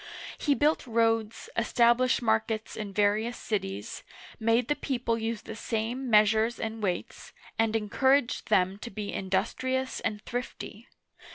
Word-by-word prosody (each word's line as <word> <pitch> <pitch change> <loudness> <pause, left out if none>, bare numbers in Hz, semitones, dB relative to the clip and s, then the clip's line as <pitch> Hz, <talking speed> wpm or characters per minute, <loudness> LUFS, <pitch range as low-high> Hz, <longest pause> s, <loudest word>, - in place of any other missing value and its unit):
He 290 -2 +1
built 295 -1 +1
roads, 225 -1 +1
established 240 +2 +3
markets 220 0 0
in 210 -2 -5
various 210 +4 +1
cities, 105 - -4 0.4
made 230 +2 +2
the 295 - +1
people 245 -5 -1
use 225 -1 -3
the 220 - -7
same 235 +4 -3
measures 220 +2 +4
and 225 0 -4
weights, 180 -4 -3 0.3
and 225 0 +2
encouraged 255 +5 +2
them 190 -1 +2
to 235 - -7
be 205 -1 -5
industrious 245 +8 -1
and 210 - -2
thrifty. 245 +1 -6
225 Hz, 130 wpm, -28 LUFS, 210-240 Hz, 0.4 s, measures